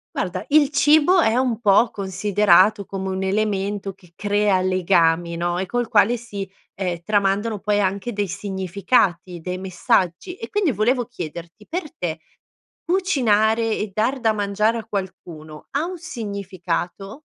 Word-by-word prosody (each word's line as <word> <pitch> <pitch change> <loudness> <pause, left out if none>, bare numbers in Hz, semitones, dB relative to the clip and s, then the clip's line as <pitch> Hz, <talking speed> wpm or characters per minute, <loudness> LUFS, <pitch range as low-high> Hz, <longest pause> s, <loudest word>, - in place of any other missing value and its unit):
Guarda - - -2
il 290 -1 +4
cibo 310 +5 +4
è 225 -6 +2
un 250 -3 0
po' 220 +1 +4
considerato 200 +1 +3
come 190 0 -5
un 190 0 -3
elemento 200 0 -1
che 180 -3 -22
crea 205 -1 +1
legami, 175 -2 +2
no, 175 +1 -1
e 190 - -3
col 245 +3 -1
quale 225 +1 +3
si, 205 -5 -7 0.2
ehm, 180 -3 -3
tramandano 205 +2 0
poi 205 +2 0
anche 200 +3 -1
dei 205 -2 -2
significati, 190 -1 -1
dei 180 +2 -5
messaggi 185 - 0
e - - -8
quindi 405 -7 +1
volevo 245 +2 +1
chiederti, 175 -2 -9
per 330 -4 -5
te 165 -2 -3 0.7
cucinare 230 - +2
e 210 -1 -4
dar 235 +6 0
da 225 -3 +2
mangiare 210 +2 0
a 220 - -9
qualcuno 170 -7 -7
ha 285 +4 0
un 365 +1 -5
significato? 200 - -5
200 Hz, 145 wpm, -22 LUFS, 185-230 Hz, 0.7 s, il